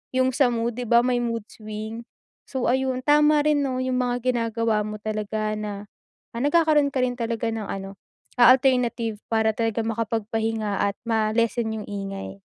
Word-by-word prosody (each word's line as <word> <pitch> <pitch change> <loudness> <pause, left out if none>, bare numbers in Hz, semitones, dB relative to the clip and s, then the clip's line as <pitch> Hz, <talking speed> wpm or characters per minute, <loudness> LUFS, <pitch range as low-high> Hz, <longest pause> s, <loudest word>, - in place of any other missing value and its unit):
yung 260 0 +2
sa 270 -4 +4
mood, 235 0 -1
'di 245 - -4
ba, 235 0 +6
may 245 -1 +1
mood 230 -2 -3
swing? 215 +1 -7 0.5
So, 260 -2 -2
ayun 260 0 0
tama 300 0 +5
rin 300 -1 +3
'no 260 -1 -2
yung 255 0 -1
mga 245 0 0
ginagawa 230 -2 0
mo 215 0 -5
talaga 215 0 -2
na, 205 -1 -6 0.5
ah, 235 - -3
nagkakaroon 300 -1 +3
ka 260 - 0
rin 245 -1 -2
talaga 230 -1 -2
ng 225 -1 -3
ano, 195 0 -6 0.4
ah, 245 - +9
alternative 245 -4 0
para 220 -1 +2
talaga 225 0 0
makapagpahinga 225 -1 -1
at 200 0 -1
ma-lessen 225 +1 +1
yung 215 - -6
ingay. 195 -1 -6
230 Hz, 165 wpm, -24 LUFS, 215-250 Hz, 0.5 s, ah